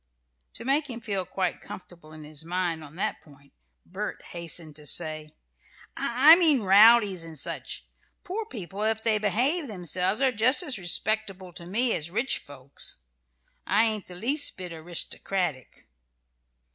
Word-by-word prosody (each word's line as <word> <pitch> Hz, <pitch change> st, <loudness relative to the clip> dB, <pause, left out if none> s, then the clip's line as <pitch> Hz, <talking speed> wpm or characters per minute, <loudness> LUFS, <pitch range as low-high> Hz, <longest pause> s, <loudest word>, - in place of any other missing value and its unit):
To -, -, -9 dB
make 285 Hz, +2 st, +1 dB
him 235 Hz, -2 st, -5 dB
feel 200 Hz, -5 st, -3 dB
quite 185 Hz, -1 st, -3 dB
comfortable 170 Hz, -4 st, -12 dB
in 155 Hz, 0 st, -12 dB
his 150 Hz, +1 st, -2 dB
mind 170 Hz, -1 st, -3 dB
on 150 Hz, +1 st, -13 dB
that 185 Hz, -, -3 dB
point, 140 Hz, -2 st, -21 dB, 0.3 s
Bert -, -, -6 dB
hastened 170 Hz, -2 st, -4 dB
to 150 Hz, -1 st, -5 dB
say: 155 Hz, -2 st, +5 dB, 0.7 s
"I 265 Hz, +7 st, +7 dB
mean 305 Hz, -, +5 dB
rowdies, 200 Hz, -2 st, +5 dB
and 165 Hz, -1 st, -10 dB
such. -, -, -4 dB, 0.4 s
Poor 415 Hz, +4 st, -5 dB
people, 200 Hz, -, -8 dB
if 220 Hz, 0 st, -1 dB
they 220 Hz, -2 st, +1 dB
behave 260 Hz, -, 0 dB
themselves, 185 Hz, 0 st, -2 dB
are 270 Hz, -1 st, +2 dB
just 250 Hz, -, +2 dB
as 265 Hz, -, -1 dB
respectable 195 Hz, 0 st, -1 dB
to 170 Hz, 0 st, -9 dB
me 230 Hz, +6 st, 0 dB
as 155 Hz, +2 st, -4 dB
rich 235 Hz, +9 st, -2 dB
folks. 135 Hz, -, -6 dB, 0.6 s
I 210 Hz, +2 st, +3 dB
ain't 215 Hz, -3 st, -2 dB
the 180 Hz, -, -11 dB
least 270 Hz, -, 0 dB
mite 180 Hz, -2 st, -6 dB
aristocratic." 165 Hz, -2 st, -4 dB
190 Hz, 150 wpm, -26 LUFS, 165-230 Hz, 0.7 s, I